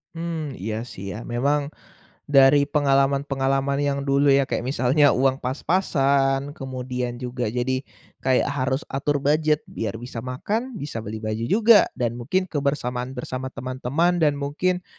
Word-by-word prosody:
Mmm, 165 -3 -4
iya 110 +2 -3
sih 100 -4 -8
ya. - - -6
Memang, 140 +5 0 0.6
dari 140 0 +5
pengalaman-pengalaman 140 -1 +1
yang 140 -1 0
dulu 140 +1 +3
ya, 140 0 +5
kayak - - -2
misalnya 135 +3 +3
uang 135 +1 +2
pas-pasan, 140 -1 +1
kemudian 125 -3 -4
juga 125 -2 -3
jadi 125 +3 -1 0.4
kayak 130 -1 +2
harus 130 +2 -1
atur 140 +2 0
budget 150 +1 +2
biar 110 -1 -4
bisa 120 0 -7
makan, 210 - -3
bisa 145 - -5
beli 110 0 -6
baju 110 +1 -2
juga, 220 0 +6
dan 120 -2 0
mungkin 185 +10 0
kebersamaan 135 -5 -2
bersama 130 +1 -4
teman-teman 135 +8 -1
dan 150 -3 +3
mungkin 180 +6 -1
135 Hz, 140 wpm, -23 LUFS, 125-145 Hz, 0.6 s, juga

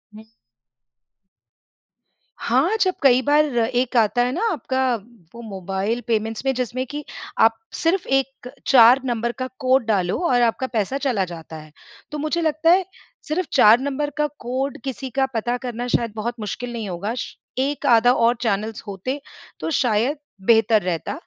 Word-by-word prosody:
हुँ। 220 - -11 2.1
हाँ, 270 - +1
जब 370 -1 +2
कई 260 -2 +6
बार 295 +2 +3
एक 245 +2 0
आता 230 +2 +3
है 250 - -1
ना 340 - -3
आपका 260 -6 0 0.4
वो 235 - -8
मोबाइल 195 +3 -3
पेमेंट्स 225 +2 -1
में 270 - +2
जिसमें 255 +1 -2
कि 295 +2 -6 0.4
आप 225 0 +5 0.2
सिर्फ़ 345 +3 0
1 270 -1 -1 0.2
4 250 0 +7
नंबर 235 -1 -1
का 255 - -2
कोड 260 -2 +2
डालो 190 -5 +1
और 245 -1 +3
आपका 240 +2 +1
पैसा 230 +3 -1
चला 245 -9 0
जाता 165 -2 -9
है। 155 -1 -11 0.4
तो 300 - -4
मुझे 310 +3 -1
लगता 320 +1 +2
है 370 0 +4 0.4
सिर्फ़ 335 +4 -1
4 230 -3 +7
नंबर 285 +2 -2
का 300 - +2
कोड 260 +3 -3
किसी 265 0 -5
का 265 - +4
पता 240 +2 -1
करना 245 0 -4
शायद 235 -3 0
बहुत 235 +2 -3
मुश्किल 240 +3 -5
नहीं 220 -4 -4
होगा 190 +5 -3
श - - -5 0.2
एक 280 +1 -1
आधा 240 +1 +5
और 235 0 +3
चैनल्स 215 -1 -1
होते 230 +9 -4 0.4
तो - - -3
शायद 245 +4 +1 0.3
बेहतर 225 -1 +5
रहता। 175 -2 -3
245 Hz, 165 wpm, -22 LUFS, 220-270 Hz, 2.1 s, 4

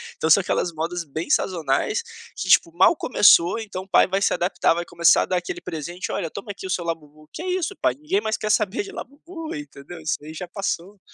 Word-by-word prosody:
Então 160 - -1
são 180 +5 +7
aquelas 180 -1 -1
modas 170 +2 -3
bem 160 +2 -6
sazonais 170 - +1 0.3
que, - - -4
tipo, 335 - +5
mal 345 - +5
começou, 205 - +5
então 200 -4 -6
o - - -19
pai - - +5
vai 190 +1 -1
se - - +2
adaptar, 175 -1 +1
vai 175 +1 -3
começar 170 -1 +4
a - - -3
dar 185 - 0
aquele 355 - -5
presente: 175 - -5
"Olha, 175 -5 -2
toma 200 +4 -7
aqui 195 - -9
o - - -5
seu 180 -1 -1
Labubu". 155 -2 -6
"Que - - -6
é 365 - -5
isso 370 +2 -1
pai? - - +3
Ninguém 315 +8 -1
mais 220 - -1
quer 215 - -3
saber 215 - +1
de 400 - -9
Labubu". 325 +1 -8
Entendeu. 145 +3 -9
Isso 155 - -1
ai 155 - -9
já 175 +3 -6
passou, 195 +1 -4
185 Hz, 230 wpm, -23 LUFS, 165-230 Hz, 0.3 s, são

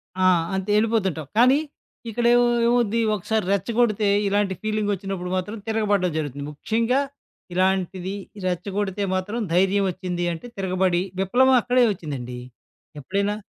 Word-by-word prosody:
ఆ! 185 - +1 0.3
అంతే 190 +2 -2
ఎళ్ళిపోతుంటావు. 195 -9 0
కానీ, 255 +4 +6 0.5
ఇక్కడేమ‌వ్ 240 +2 +3 0.2
ఎమవ్వు‌ద్ది, 235 -2 +2
ఒకసారి 215 +1 -1
రెచ్చగొడితే 215 +1 +1 0.2
ఇలాంటి 200 -1 +1
ఫీలింగొచ్చినప్పుడు 200 -4 -2
మాత్రం 205 +5 -4
తిరగబడ్డం 205 -5 +1
జరుగుతుంది. 145 -2 -4
ముఖ్యంగా, 230 - 0 0.5
ఇలాంటిది 185 0 0 0.3
రెచ్చగొడితే 190 +2 -2
మాత్రం 205 +5 -3 0.2
ధైర్యం 195 +2 +3
ఒచ్చింది 180 -1 -4
అంటే 165 - -9
తిరగబడి, 185 -2 +1 0.2
విప్లవం 255 +7 +4
అక్కడే 245 +1 +3
వచ్చిందండి. 135 -9 -6 0.6
ఎప్పుడైనా? 200 +7 -1
195 Hz, 110 wpm, -23 LUFS, 180-220 Hz, 0.6 s, కానీ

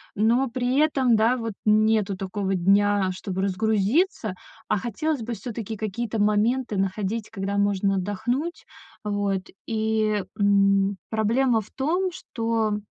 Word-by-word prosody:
но 235 +5 +2
при 250 +2 -1
этом, 265 -7 +3
да, 230 +3 +3
вот 230 -2 -3
нету 215 -1 +3
такого 195 0 -2
дня, 195 +1 +3
чтобы 190 0 -4
разгрузиться. 215 - +1 0.3
А - - +2
хотелось 245 +7 -2
бы 235 +2 -4
всё-таки 230 -2 -5
какие-то 220 +1 -2
моменты 215 +2 +1
находить, 200 +3 -2
когда 200 -1 -3
можно 200 -1 +1
отдохнуть. 245 - -2 0.4
Вот, 205 -2 -1 0.3
и, 220 -2 0 0.2
м, 200 -1 +3
проблема 230 +2 +2
в 205 - -15
том, 350 +7 0
что 225 -5 -1
215 Hz, 125 wpm, -25 LUFS, 200-235 Hz, 0.4 s, этом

